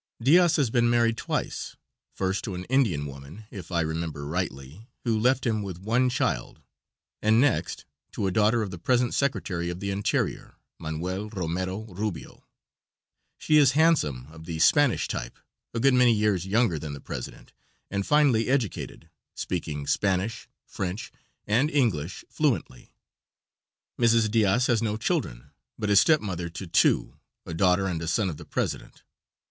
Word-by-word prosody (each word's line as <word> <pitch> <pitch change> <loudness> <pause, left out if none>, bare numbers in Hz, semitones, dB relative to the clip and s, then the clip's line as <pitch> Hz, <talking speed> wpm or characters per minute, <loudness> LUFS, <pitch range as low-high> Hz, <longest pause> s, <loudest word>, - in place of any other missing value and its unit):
Diaz 165 +7 +5
has 135 -7 +1
been 120 -1 +3
married 115 -1 +3
twice - - -3 0.4
first 95 +1 -2
to 100 -5 -4
an 90 - -5
Indian 110 - +1
woman, 70 +9 -10
if 95 -3 -9
I 85 -1 +1
remember 80 -2 -3
rightly, 80 - -5 0.2
who 115 -3 +1
left 130 +4 +2
him 110 -3 0
with 95 -4 -6
one 115 +7 +1
child, 125 - -2 0.6
and 110 +1 +4
next 140 +2 +1 0.3
to - - -2
a 95 - +1
daughter 110 +3 +3
of 100 - -5
the 90 - -7
present 125 +5 +1
Secretary 90 -11 -1
of 90 +1 -5
the 100 0 -3
Interior, 100 +1 -2 0.2
Manuel 90 +6 -4
Romero 95 0 -3
Rubio. 105 -3 -6 0.9
She 155 - +3
is 140 -4 +5
handsome, 145 - +2
of 80 0 -12
the 85 -2 -4
Spanish 140 - +3
type, - - -5 0.3
a 115 - -3
good 135 +3 +4
many 125 -2 +5
years 105 -4 +1
younger 105 -5 +2
than 75 -1 -6
the 70 - -7
president, 60 - -8 0.4
and 100 0 -1
finely 140 -4 +3
educated, 130 -7 -2 0.3
speaking 75 -2 -4
Spanish, 100 +7 -1 0.2
French 95 +3 -5 0.3
and 120 +8 +2
English 105 - 0
fluently. 65 - -2 1.1
Mrs. 115 -2 +3
Diaz 115 +2 +3
has 120 -3 +2
no 110 -2 -1
children, - - -2 0.3
but 105 -1 -1
is 100 - +7
step 155 -2 +4
mother 90 -4 -4
to 90 +3 -7
two 85 - +2 0.3
a 85 - -6
daughter 90 +3 +3
and 85 -4 -2
a 85 - -4
son 95 +3 +1
of 75 - -8
the - - -11
president. - - -4
100 Hz, 160 wpm, -26 LUFS, 85-120 Hz, 1.1 s, is